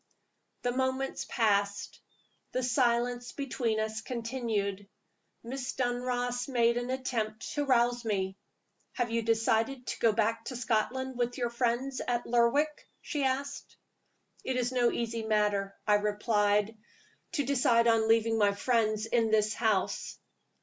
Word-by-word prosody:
THE 245 - +1
moments 260 +1 -1
passed; 205 -3 0 0.5
the 255 - 0
silence 245 -1 +1
between 245 -5 -1
us 220 0 -2
continued. 225 -5 -3 0.5
Miss 255 +2 -4
Dunross 245 0 -1
made 235 -3 +2
an 245 +1 -3
attempt 235 -5 -3
to 290 -1 -1
rouse 245 -2 +2
me. 190 -4 -1 0.6
"Have 240 -2 -1
you 230 0 +1
decided 225 +3 +1
to - - -4
go 230 - +4
back 225 +1 0
to 255 - -5
Scotland 250 +2 -1
with 245 +1 -1
your 240 -2 -1
friends 245 +2 -1
at 240 -1 0
Lerwick?" 250 +6 +1 0.2
she 295 -3 -2
asked. 275 +2 -2 0.7
"It 260 - -2
is 245 0 0
no 245 -2 +3
easy 230 -1 -2
matter," 210 -2 0
I 210 - +4
replied, 210 0 +1 0.6
"to 290 - +1
decide 245 -3 +3
on 225 -1 +3
leaving 225 0 +3
my 205 -1 +4
friends 215 -1 +1
in 225 0 +1
this 215 -1 +2
house." 215 -5 0
235 Hz, 135 wpm, -30 LUFS, 220-250 Hz, 0.7 s, go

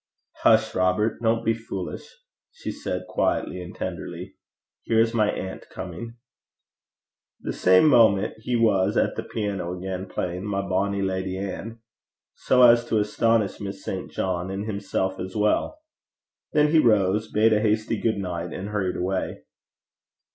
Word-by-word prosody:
'Hush, 110 0 +4
Robert! 95 +5 +1
Don't 115 0 +1
be 115 - +3
foolish,' 100 -5 -6 0.4
she 485 - -6
said, - - -4
quietly - - -1
and - - -9
tenderly. - - -6 0.5
'Here 115 -1 +1
is 115 0 +3
my 110 -2 +2
aunt 95 0 -5
coming.' 95 +6 -7 1.3
The - - -3
same 95 +11 +5
moment 110 -7 +5
he 120 +2 -2
was 105 -4 +2
at - - +2
the - - -2
piano 95 -5 -3
again, 95 +1 -5
playing 90 0 -3
My 100 -1 -2
Bonny 100 +1 0
Lady 95 0 -2
Ann, 100 +4 -6 0.5
so 125 -1 +3
as 120 -1 +7
to 115 - 0
astonish 105 0 +1
Miss 100 -1 -6
St. - - -4
John, 90 -1 -2
and 95 +2 -4
himself 100 -2 -2
as 95 +1 -6
well. 105 - +1 0.7
Then 150 0 +3
he 160 - +5
rose, 105 -4 +2
bade 110 +1 +4
her 105 - +4
a - - -2
hasty 110 0 0
good 110 -2 +1
night, 90 -4 -4
and 95 +2 -5
hurried 100 -3 -1
away. 95 +1 -2
100 Hz, 155 wpm, -25 LUFS, 95-115 Hz, 1.3 s, as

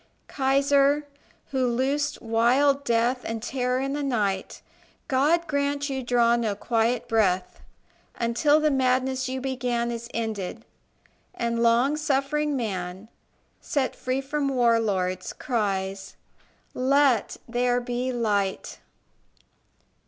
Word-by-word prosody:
Kaiser 280 +1 +2 0.5
who 260 -2 +1
loosed 275 +4 -1
wild 255 +5 +3
death 240 +1 +1
And 225 -1 -4
terror 250 0 -1
in 275 +1 -2
the 295 - -2
night 210 -8 -2 0.4
God 300 +6 +2
grant 285 -1 -1
you 265 -1 -2
draw 240 -1 +3
no 225 -4 -1
quiet 230 +2 0
breath, 190 -5 +1 0.6
Until 240 +6 +2
the 305 -1 +2
madness 260 0 +1
you 260 0 -3
began 245 -2 -2
Is 235 0 -6
ended, 220 -1 -4 0.7
and 235 0 -1
long 240 +5 +3
suffering 300 0 0
man, 190 -3 -4 0.5
Set 270 -3 -1
free 255 +1 -2
from 280 +1 -2
war 240 -3 +3
lords, 185 -4 -2
cries, 195 -7 -2 0.6
"Let 265 -3 +2
there 245 +1 +1
be 245 +1 -2
Light." 205 -5 -1
250 Hz, 115 wpm, -25 LUFS, 230-275 Hz, 0.7 s, wild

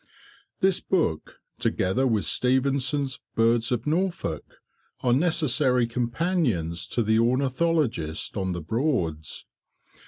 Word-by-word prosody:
This 190 0 +3
book, 160 - -1 0.2
together 110 +9 +1
with 110 -4 +1
Stevenson's 135 +1 +1 0.2
"Birds 115 +1 +2
of 120 -2 -1
Norfolk," 175 +4 -2 0.5
are 125 -2 +2
necessary 140 -5 +2
companions 120 - -1
to 120 - 0
the 110 +1 +2
ornithologist 130 - 0
on 95 -3 -1
the 85 - -4
Broads. 85 - -2
125 Hz, 100 wpm, -25 LUFS, 110-150 Hz, 0.5 s, This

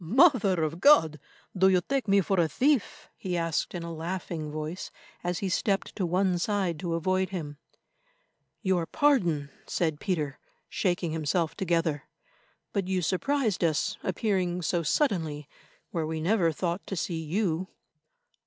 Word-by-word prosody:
"Mother 210 - +4
of 155 +2 -2
God! 160 - +5 0.4
do 190 +1 +5
you 185 -1 +4
take 270 +5 -2
me 200 0 +5
for 190 +1 0
a 165 - +4
thief?" 265 - 0
he 180 -2 -3
asked 165 +1 -1
in 170 - -4
a 170 0 -5
laughing 165 -1 -4
voice, 155 +4 -5 0.3
as 175 0 -1
he - - +1
stepped 195 +1 0
to 185 -4 -1
one 180 +1 +1
side 185 -4 0
to 170 -2 -2
avoid 185 +2 0
him. 150 -6 -6 1.0
"Your 180 -3 +1
pardon," 175 - +2 0.2
said 160 -4 -1
Peter, 155 -8 -2 0.3
shaking 175 -3 -1
himself 160 +1 0
together; 165 -5 0 0.7
"but 195 -3 -1
you 185 -1 0
surprised 215 - 0
us 170 +6 +1
appearing 180 -5 -1
so 170 +2 +1
suddenly 160 - 0 0.4
where 160 -2 -1
we 160 0 -3
never 170 0 +2
thought 175 +3 -2
to 195 - -3
see 165 -1 -2
you." 180 +1 -1
175 Hz, 150 wpm, -28 LUFS, 160-195 Hz, 1.0 s, God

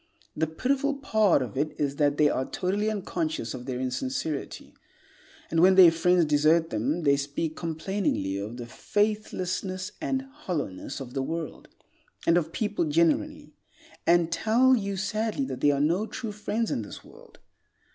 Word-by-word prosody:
The 160 +1 0
pitiful 270 - 0
part 220 - +2
of 115 -5 -7
it 150 +2 -2
is 140 -1 -1
that 145 -1 +2
they 150 - +5
are 130 -2 -1
totally 200 +4 -1
unconscious 165 - -3
of 125 0 -8
their 125 -2 -3
insincerity, 130 +3 -3 0.8
and 165 - +2
when 185 +2 +6
their 180 -3 +9
friends 175 +1 +3
desert 155 +2 +3
them, 135 +10 -1
they 140 -1 +4
speak 145 +3 -3
complainingly 165 - -2
of 110 +4 -6
the 120 - -6
faithlessness 185 - -2
and 265 0 -1
hollowness 175 - -5
of 125 -2 -8
the 135 - -1
world, 165 +3 -5 0.6
and 165 - +4
of 165 -2 +1
people 210 -4 -1
generally, 160 +1 +1 0.5
and 170 -1 +4
tell 240 +8 +4
you 200 -4 -2
sadly 215 +6 -1
that - - -6
there 145 -1 +4
are - - -1
no 170 +9 +1
true 230 -3 -5
friends 210 +2 -2
in - - -1
this 105 - -9
world. - - -17
165 Hz, 160 wpm, -27 LUFS, 145-205 Hz, 0.8 s, their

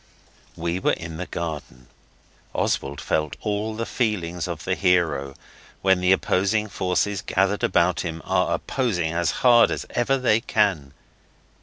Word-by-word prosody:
We 85 +2 -2
were - - +2
in 80 -1 -6
the 90 - -5
garden. 75 -7 -6 0.7
Oswald 70 0 -1
felt 75 -2 -1
all 105 +1 -2
the 115 +1 -3
feelings 90 -10 -2
of 85 -3 -5
the 95 - 0
hero 85 -8 +1 0.5
when 95 -1 +3
the 90 +1 +3
opposing 100 +3 +1
forces 95 +1 -1
gathered 95 +2 0
about 85 +1 +2
him 80 -2 -3
are - - +1
opposing 95 -12 -1
as 85 0 +1 0.2
hard 120 -1 +7
as - - -3
ever 130 +3 +1
they 120 -4 +3
can. 95 - 0
90 Hz, 145 wpm, -24 LUFS, 85-105 Hz, 0.7 s, hard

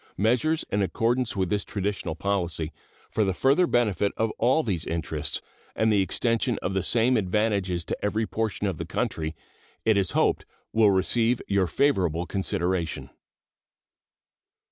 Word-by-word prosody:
Measures 125 - +2
in 100 - +1
accordance 115 +5 0
with 95 -2 -1
this 105 -1 +1
traditional 100 -5 -3
policy, 85 -4 -1 0.4
for 110 - +1
the 95 -2 0
further 140 - +3
benefit 105 - +1
of 110 0 +1
all 130 +7 +3
these 90 - -2
interests 85 0 -3 0.3
and 110 0 +2
the 100 - +4
extension 115 +4 +1
of 95 - -1
the 95 - +1
same 120 +6 +3
advantages 100 -3 0
to - - -2
every 105 +2 0
portion 110 -2 -2
of 95 -6 -2
the - - -3
country, 80 0 -2 0.5
it 110 - +4
is 95 -4 +1
hoped - - +2 0.3
will 110 -2 +5
receive 115 +5 +2
your 100 -2 +2
favorable 90 - +1
consideration. 85 -7 -2
100 Hz, 145 wpm, -26 LUFS, 90-115 Hz, 0.5 s, will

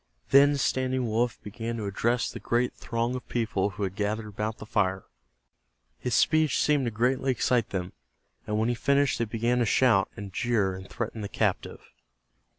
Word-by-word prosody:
Then 140 +1 +6
Standing 130 -1 0
Wolf 115 +2 0
began 115 +2 -5
to 110 - -4
address 115 +5 0
the - - -7
great 120 +1 0
throng 115 +1 -2
of 125 - -6
people 110 -4 0
who 100 +1 -6
had 95 -1 -2
gathered 105 +2 -2
about 105 +1 -4
the - - -9
fire. 95 -3 0 1.0
His 125 -2 -1
speech 155 -3 +3
seemed 145 -3 +2
to 120 - -1
greatly 125 +4 0
excite 125 -2 +1
them, 90 -1 -4 0.5
and 105 - -1
when 110 +1 +1
he - - +2
finished 140 +2 +1
they 115 - +1
began 115 +3 0
to 120 - +2
shout, 110 -5 +3
and 100 -2 -7
jeer, 105 -4 +1
and 95 0 -9
threaten 115 -1 -4
the 100 - -5
captive. - - -1
115 Hz, 180 wpm, -27 LUFS, 105-125 Hz, 1.0 s, Then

